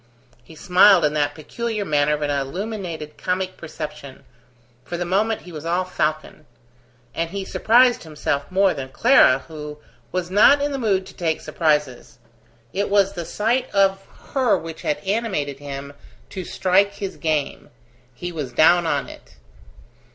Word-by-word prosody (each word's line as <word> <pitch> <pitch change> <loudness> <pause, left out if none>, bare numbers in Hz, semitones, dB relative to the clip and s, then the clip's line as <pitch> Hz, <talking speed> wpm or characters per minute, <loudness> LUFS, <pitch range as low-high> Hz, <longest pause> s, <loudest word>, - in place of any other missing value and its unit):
He 160 - -15
smiled 180 +1 +5
in 150 - +1
that 145 -1 0
peculiar 215 +6 -4
manner 150 -1 +2
of 150 - -5
an 145 - 0
illuminated 160 +2 -4
comic 185 0 -2
perception: 150 -4 -8 0.6
for 175 - -5
the 175 - -2
moment 210 +5 0
he 180 - -11
was 155 -2 -8
all 175 +2 0
falcon; 155 -3 -3 0.7
and 165 0 -2
he 195 +1 -5
surprised 245 +4 +3
himself 150 -3 -3
more 195 0 +3
than 135 -3 -6
Clara, 135 - +4
who 150 -2 -8 0.3
was 180 -1 -3
not 215 +9 +6
in 290 +1 -1
the 275 - -3
mood 195 -5 +1
to - - -12
take 160 -3 -1
surprises. 150 -6 -1 0.6
It 200 +2 -1
was 200 -1 +3
the 170 -2 -5
sight 240 +8 0
of 195 -1 +3 0.3
her 260 -5 +3
which 165 0 -8
had 150 - -1
animated 190 - -2
him 140 0 -7 0.4
to 185 -2 -6
strike 195 +2 +2
his 195 -2 -5
game; 155 -3 -2 0.5
he 175 +7 -5
was 145 -7 -5
down 175 +1 +5
on 145 -3 -1
it. - - -14
175 Hz, 160 wpm, -22 LUFS, 150-200 Hz, 0.7 s, not